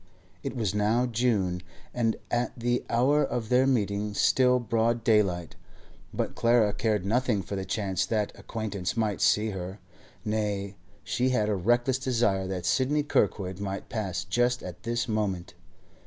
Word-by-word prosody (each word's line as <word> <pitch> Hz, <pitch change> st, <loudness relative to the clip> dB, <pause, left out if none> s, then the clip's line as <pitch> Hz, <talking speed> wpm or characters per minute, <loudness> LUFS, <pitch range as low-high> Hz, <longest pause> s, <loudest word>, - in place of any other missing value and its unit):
It 135 Hz, -, -4 dB
was 110 Hz, -6 st, -1 dB
now 105 Hz, +4 st, +2 dB
June, 110 Hz, -7 st, 0 dB, 0.3 s
and 115 Hz, -2 st, +1 dB, 0.2 s
at 120 Hz, +1 st, -1 dB
the 120 Hz, +1 st, 0 dB
hour 135 Hz, +6 st, +3 dB
of 120 Hz, -5 st, -2 dB
their 125 Hz, +1 st, +4 dB
meeting 105 Hz, -4 st, 0 dB
still 125 Hz, +2 st, +4 dB
broad 115 Hz, -1 st, 0 dB
daylight, 95 Hz, -7 st, +2 dB, 0.6 s
but -, -, -2 dB
Clara 115 Hz, -3 st, +3 dB
cared 105 Hz, -4 st, 0 dB
nothing 115 Hz, -1 st, +1 dB
for 100 Hz, -, -5 dB
the 95 Hz, -1 st, -3 dB
chance 95 Hz, -4 st, -1 dB
that 105 Hz, -2 st, 0 dB
acquaintances 105 Hz, -4 st, -4 dB
might 110 Hz, -3 st, 0 dB
see 110 Hz, +1 st, +3 dB
her; 95 Hz, +1 st, -6 dB, 0.5 s
nay, 105 Hz, -2 st, -2 dB, 0.3 s
she 125 Hz, +6 st, 0 dB
had 110 Hz, -5 st, +1 dB
a 105 Hz, -, +1 dB
reckless 120 Hz, +7 st, +2 dB
desire 115 Hz, -8 st, +1 dB
that 90 Hz, -2 st, -4 dB
Sidney 130 Hz, +11 st, +2 dB
Kirkwood 95 Hz, -8 st, 0 dB
might 100 Hz, -1 st, -4 dB
pass 95 Hz, -6 st, -2 dB
just 120 Hz, +6 st, +1 dB
at -, -, -8 dB
this 120 Hz, +2 st, -1 dB
moment. 100 Hz, -5 st, -2 dB
110 Hz, 155 wpm, -28 LUFS, 100-120 Hz, 0.6 s, their